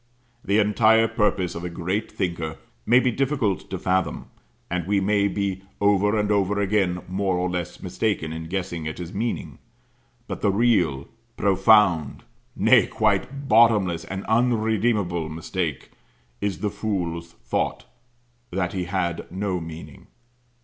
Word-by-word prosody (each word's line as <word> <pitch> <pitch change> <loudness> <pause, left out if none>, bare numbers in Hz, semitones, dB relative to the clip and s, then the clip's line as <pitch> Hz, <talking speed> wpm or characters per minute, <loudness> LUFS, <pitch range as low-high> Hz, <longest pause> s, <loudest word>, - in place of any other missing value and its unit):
The 100 - +1
entire 110 +2 +4
purpose 105 -5 0
of 85 - -6
a 90 - -3
great 90 +5 -3
thinker 85 -4 -3 0.3
may 120 +2 +6
be 130 -1 +1
difficult 130 -6 -1
to 95 - -3
fathom, 95 0 -1 0.4
and 90 -1 -3
we 100 0 +2
may 100 +1 +2
be 100 -2 -2 0.2
over 105 +1 +3
and 105 0 +1
over 100 0 +1
again 95 -3 +1
more 95 0 0
or 90 +1 0
less 90 -1 -4
mistaken 90 -3 -1
in 80 0 -6
guessing 85 -3 -3
at 80 - -5
his 90 +2 -7
meaning; 115 +4 -3 0.7
but - - -5
the 105 - +3
real, 95 - +2 0.3
profound, 95 -5 +3 0.3
nay, - - +5
quite 110 +7 0
bottomless, 105 -7 +4
and 95 +1 -5
unredeemable 110 -7 +1
mistake, 80 -1 -4 0.5
is 100 -2 -2
the 105 -2 -1
fool's 85 -5 -3
thought - - -3 0.6
that 90 -1 -2
he 90 -2 -2
had 90 -2 -2
no 95 -1 -2
meaning. 80 0 -10
95 Hz, 140 wpm, -24 LUFS, 90-105 Hz, 0.7 s, may